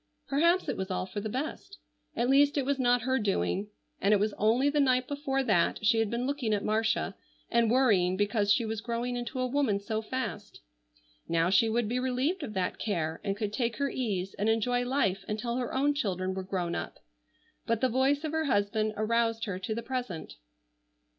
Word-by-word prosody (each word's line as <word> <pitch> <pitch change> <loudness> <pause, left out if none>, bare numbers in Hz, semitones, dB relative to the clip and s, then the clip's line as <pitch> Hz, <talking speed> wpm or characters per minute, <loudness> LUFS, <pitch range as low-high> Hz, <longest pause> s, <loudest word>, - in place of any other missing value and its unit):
Perhaps 335 +6 +3
it - - -2
was 190 +1 -3
all 185 0 -1
for 205 +2 -5
the 215 - -4
best. 300 - -5 0.4
At 240 - +1
least 285 +2 +4
it 275 - +1
was 280 0 0
not 245 -2 +3
her 260 +1 +1
doing. 195 - 0 0.3
And 205 +2 +4
it - - +2
was 210 +1 0
only 230 +6 +2
the 295 +1 +2
night 255 -2 +3
before 280 -2 -1
that 205 -3 +1
she 225 +1 +4
had 225 -2 +1
been 235 +2 -2
looking 260 -6 0
at 205 - -3
Marcia 215 -1 0 0.4
and 235 -1 +3
worrying 205 -8 +3
because 205 0 +1
she 230 +3 +3
was 220 -1 -3
growing 240 +1 -2
into 245 +2 -4
a 255 - +1
woman 255 -6 +1
so 220 +2 -3
fast. 220 -3 -5 0.7
Now 165 +1 +2
she 225 +3 +4
would 230 0 0
be 245 +3 -1
relieved 260 +8 0
of 225 -8 -6
that 185 -1 -1
care, 165 -6 -2
and 195 -1 -2
could 210 -1 -3
take 235 0 -1
her 280 -1 0
ease 195 -7 -2
and 210 +2 +2
enjoy 245 +2 +1
life 200 -8 0
until 235 +3 -2
her 245 -2 -2
own 285 +2 +2
children 190 -8 -1
were 190 - -3
grown 185 -2 -2
up. - - -4 0.7
But 230 -1 0
the 260 - +4
voice 265 +4 +1
of 310 - -2
her 320 0 0
husband 215 -2 +1
aroused 225 +1 +1
her 190 -4 -4
to 205 +4 -3
the 235 - -4
present. 245 -9 -4
230 Hz, 205 wpm, -29 LUFS, 205-260 Hz, 0.7 s, least